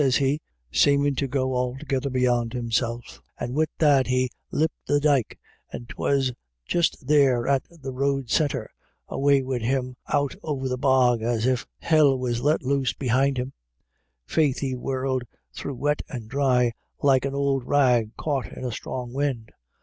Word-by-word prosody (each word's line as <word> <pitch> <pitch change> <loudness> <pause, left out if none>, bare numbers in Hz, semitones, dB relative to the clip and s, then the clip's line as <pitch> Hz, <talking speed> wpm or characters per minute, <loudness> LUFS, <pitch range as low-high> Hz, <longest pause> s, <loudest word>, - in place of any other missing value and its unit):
sez 135 -2 +3
he, 140 +2 +1 0.3
seemin* 140 - +3
to 135 +1 -1
go 130 0 -1
altogether 130 +2 -1
beyond 125 -2 +1
himself; 120 -1 -2 0.2
and 125 - -3
wid 155 +2 +1
that 145 -4 +4
he 130 0 +1 0.2
lep' 160 +2 +1 0.2
the 145 - +3
dyke 145 -5 +1 0.3
— 120 - -9
'twas 135 -2 0 0.3
just 170 -5 0
there 135 -4 +3
at 135 -1 +3
the 145 -6 -8
road 135 0 -1
corner 150 -4 +1 0.3
— - - -41
and - - -5
away 140 -1 +3
wid 130 -2 -2
him 125 +1 -1
out 140 -1 0
over 135 -4 -3
the 125 - -1
bog 125 -2 +3
as 115 0 0
if 130 -1 0
Hell 150 -4 +4
was 120 -2 -2
let 150 +3 +2
loose 135 -1 +1
behind 135 +1 +1
him. 125 +2 -3 0.7
Faith, 140 - +1
he 135 -2 -2
whirrelled 130 0 -2 0.3
through 140 - -5
wet 145 +3 0
and 120 -8 -6
dry 125 -2 +2 0.3
like 135 -2 +4
an 140 0 -2
ould 140 -2 +1
rag 125 -5 +3
caught 140 -4 -2
in - - -7
a 125 - -2
strong 120 +2 -5
wind. 130 -6 -2
130 Hz, 170 wpm, -25 LUFS, 125-140 Hz, 0.7 s, that